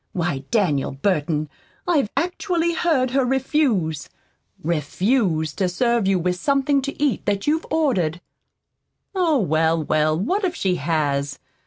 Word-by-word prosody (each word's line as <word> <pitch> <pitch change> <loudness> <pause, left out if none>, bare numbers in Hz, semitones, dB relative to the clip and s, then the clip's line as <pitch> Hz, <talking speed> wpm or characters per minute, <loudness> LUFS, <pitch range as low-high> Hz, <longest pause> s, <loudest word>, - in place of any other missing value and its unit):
Why, 160 -7 -2
Daniel 165 - +1
Burton, 155 0 0 0.4
I've 295 -11 +2
actually 345 -1 0
heard 295 -7 +1
her 270 0 +2
refuse 250 - 0 0.5
REFUSE 170 - 0
to 185 -2 +1
serve 235 +2 +1
you 195 -1 +3
with 180 +1 -1
something 275 +5 +1
to 280 +1 -6
eat 285 -6 0
that 200 -1 0
you'd 315 +2 0
ordered." 195 - +1 0.9
"Oh, 345 -6 +2
well, 160 - +1
well, 155 +1 +1
what 375 - 0
if 360 -2 0
she 185 -2 0
has? 145 -3 -1
195 Hz, 135 wpm, -22 LUFS, -, 0.9 s, you